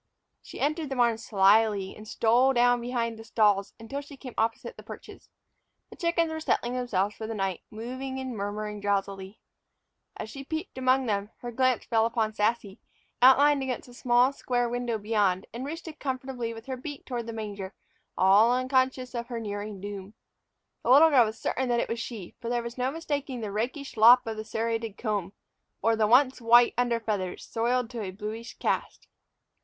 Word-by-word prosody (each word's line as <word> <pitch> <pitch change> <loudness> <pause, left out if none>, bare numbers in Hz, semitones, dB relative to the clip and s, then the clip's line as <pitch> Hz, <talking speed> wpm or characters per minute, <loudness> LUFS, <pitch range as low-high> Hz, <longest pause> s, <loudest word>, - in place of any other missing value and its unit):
She - - -11
entered 305 +1 -1
the 270 - -3
barn 235 -3 +2
slyly 205 -1 +3
and 215 - -12
stole 240 +5 +3
down 245 0 +3
behind 235 -2 -2
the - - -9
stalls 210 -3 +2
until 225 +6 -5
she 285 0 -13
came 255 -3 -9
opposite 225 +1 -1
the - - -11
perches. - - -12 0.6
The - - -10
chickens 335 -1 0
were 320 - -4
settling 245 -5 0
themselves 210 -5 -1
for 220 - -6
the 225 - -4
night, 195 -3 -2
moving 255 +4 -6
and 260 -2 -5
murmuring 210 0 -4
drowsily. 195 0 -2 0.8
As 220 - -5
she 275 +2 -8
peeped 315 +5 -5
among 260 0 +2
them, 205 -2 -1
her 240 - -5
glance 255 0 +1
fell 225 -1 +2
upon 225 -2 -1
Sassy, 210 -2 -1 0.4
outlined 280 +3 +6
against 260 -2 -3
the 245 - -15
small 245 +2 +3
square 245 -3 -1
window 240 -1 -2
beyond 205 -3 +1
and 250 +4 -5
roosted 320 0 -7
comfortably 255 -3 -3
with 225 0 -10
her 260 -1 -4
beak 285 +2 -8
toward 240 -3 -4
the - - -4
manger, 205 -3 -6 0.4
all 200 +5 +5
unconscious 255 0 0
of 235 -1 -4
her 240 -2 -4
nearing 205 -1 -5
doom. 200 +1 -7 0.7
The - - -3
little 300 +5 +7
girl 255 -5 +6
was 220 +1 -5
certain 260 +2 -2
that 240 -1 +2
it - - -2
was 230 - -2
she, 230 -6 -7
for 235 - -4
there 240 -1 0
was 235 0 -6
no 255 0 0
mistaking 285 -4 -4
the 210 -2 -4
rakish 250 +7 -3
lop 240 +3 +7
of 225 -1 -4
the 215 0 -6
serrated 225 -1 -3
comb, 205 -5 -2 0.5
or 225 0 +3
the 220 -1 +2
once 255 +2 +4
white 240 +1 +6
under 240 -1 +1
feathers 205 -5 -3
soiled 240 +1 -1
to 235 -2 -5
a 195 - -4
bluish 215 +4 -7
cast. - - -2
235 Hz, 190 wpm, -27 LUFS, 215-255 Hz, 0.8 s, little